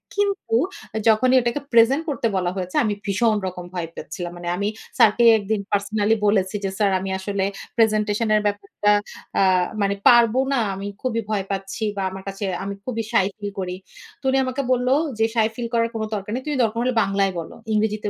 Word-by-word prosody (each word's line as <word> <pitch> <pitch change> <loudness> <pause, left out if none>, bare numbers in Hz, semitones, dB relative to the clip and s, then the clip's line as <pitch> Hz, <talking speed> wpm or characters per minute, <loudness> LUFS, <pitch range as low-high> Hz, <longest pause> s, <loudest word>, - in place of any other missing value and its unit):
কিন্তু 400 - 0 0.5
যখনই 250 +4 +4
ওইটাকে 240 +4 -1
প্রেজেন্ট 250 +7 +5
করতে 255 -5 0
বলা 180 -1 0
হয়েছে 185 -1 -5
আমি 215 - 0
ভীষণ 215 +2 +2
রকম 180 -1 -6
ভয় 170 -2 -3
পাচ্ছিলাম। 175 +3 -6
মানে 175 - -7
আমি 200 +2 -1 0.3
স্যারকে 225 +2 +5
একদিন 205 0 -2
পার্সোনালি 205 +2 +1
বলেছি 195 -1 +1
যে 195 - 0
স্যার 205 -2 +2
"আমি 190 +1 -4
আসলে 195 0 -1 0.3
প্রেজেন্টেশন 215 0 +2
এর 210 - +3
ব্যাপারটা 205 0 0 0.5
আ - - +5 0.4
মানে 200 0 +1
পারব 235 -1 +6 0.2
না। 270 - +2 0.2
আমি 195 +1 -5 0.2
খুবই 230 -3 0
ভয় 200 -3 0
পাচ্ছি 195 0 -4 0.2
বা 195 - -1
আমার 190 0 -8
কাছে 195 +1 -5 0.2
আমি 200 - -4
খুবই 230 -3 -2
সাই 195 -4 +4
ফিল 205 -1 -5
করি।" 180 -1 -3 0.5
তো - - -16
উনি 265 - +2
আমাকে 255 +2 -2
বলল 250 0 +1 0.3
যে 225 - +4
"সাই 220 -1 +4
ফিল 240 -1 -3
করার 230 0 +2
কোন 220 -1 -3
দরকার 205 0 -5
নেই। 255 - -4
তুমি 295 - -1
দরকার 225 +1 -1
হলে 255 - +1
বাংলায় 195 -1 0
বলো। 165 - -8 0.2
ইংরেজিতে 215 0 0
210 Hz, 190 wpm, -22 LUFS, 195-230 Hz, 0.5 s, পারব